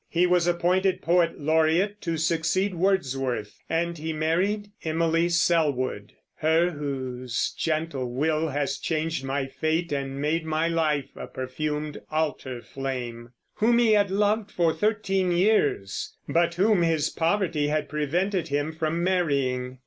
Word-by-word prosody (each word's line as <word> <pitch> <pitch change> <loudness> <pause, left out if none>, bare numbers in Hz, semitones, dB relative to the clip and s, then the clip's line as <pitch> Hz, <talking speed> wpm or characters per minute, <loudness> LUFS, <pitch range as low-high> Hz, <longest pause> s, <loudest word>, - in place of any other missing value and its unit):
He 175 +1 +3
was 180 -1 +3
appointed 185 +2 +1
poet 170 0 +2
laureate, 160 +7 +2
to 165 -2 -2
succeed 165 +5 +1
Wordsworth; 135 - -1
and 170 0 -1
he 160 +1 -3
married 185 +7 0
Emily 165 +1 +1
Sellwood, 145 -11 +1 0.2
Her 165 +3 +3
whose 130 -5 -3
gentle 155 -5 -2
will 155 +5 0
has 145 -1 -2
changed 160 -3 -2
my 135 +1 -1
fate 160 +5 -1
And 135 -1 -3
made 155 +3 0
my 160 +1 0
life 155 -4 0
a - - -7
perfumed 150 +3 -4
altar 145 -5 -2
flame, 125 -3 -5 0.2
whom 235 +2 +3
he 235 -2 +4
had 205 -2 +3
loved 205 +2 +1
for 170 -5 +1
thirteen 195 -4 0
years, 175 - +1
but 170 0 +2
whom 200 +1 +3
his 160 -2 +1
poverty 165 -3 0
had 150 0 0
prevented 170 +6 -1
him 145 +2 -1
from 160 +1 -2
marrying. 140 -8 0
160 Hz, 135 wpm, -26 LUFS, 145-175 Hz, 0.2 s, he